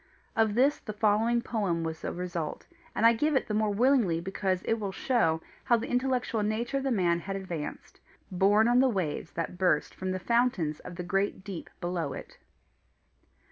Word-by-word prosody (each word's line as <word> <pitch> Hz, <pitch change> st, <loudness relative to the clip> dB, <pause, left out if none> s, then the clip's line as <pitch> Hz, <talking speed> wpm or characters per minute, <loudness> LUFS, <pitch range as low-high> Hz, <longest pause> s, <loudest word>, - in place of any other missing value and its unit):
Of 220 Hz, -2 st, +2 dB
this 275 Hz, +5 st, +3 dB
the 215 Hz, -, -7 dB
following 220 Hz, +3 st, +2 dB
poem 190 Hz, -7 st, -1 dB
was 160 Hz, -1 st, -5 dB
a -, -, -2 dB
result, 175 Hz, -3 st, -4 dB, 0.3 s
and 225 Hz, -, +2 dB
I 230 Hz, -, +8 dB
give 295 Hz, +6 st, +1 dB
it 265 Hz, -, +2 dB
the 215 Hz, -, -4 dB
more 215 Hz, 0 st, +2 dB
willingly 225 Hz, -6 st, +3 dB
because 190 Hz, +1 st, -2 dB
it 225 Hz, -, 0 dB
will 200 Hz, -2 st, -3 dB
show 190 Hz, -8 st, +1 dB, 0.2 s
how 235 Hz, -, +4 dB
the 230 Hz, -, -5 dB
intellectual 250 Hz, -3 st, 0 dB
nature 225 Hz, +5 st, -1 dB
of 270 Hz, -, -2 dB
the 275 Hz, -, 0 dB
man 175 Hz, -7 st, +2 dB
had 195 Hz, +3 st, -5 dB
advanced, 175 Hz, -6 st, -6 dB, 0.3 s
borne 200 Hz, +4 st, +4 dB
on 245 Hz, +1 st, +4 dB
the 265 Hz, 0 st, +5 dB
waves 175 Hz, -7 st, -2 dB
that 170 Hz, +2 st, -4 dB
burst 175 Hz, -5 st, +2 dB
from 185 Hz, -, -4 dB
the 185 Hz, -, -1 dB
fountains 185 Hz, -7 st, +1 dB
of 180 Hz, -, -9 dB
the 180 Hz, -, -5 dB
great 195 Hz, +1 st, -1 dB
deep 190 Hz, -4 st, -7 dB
below 175 Hz, -5 st, -2 dB
it. -, -, -10 dB
200 Hz, 190 wpm, -29 LUFS, 175-235 Hz, 0.3 s, I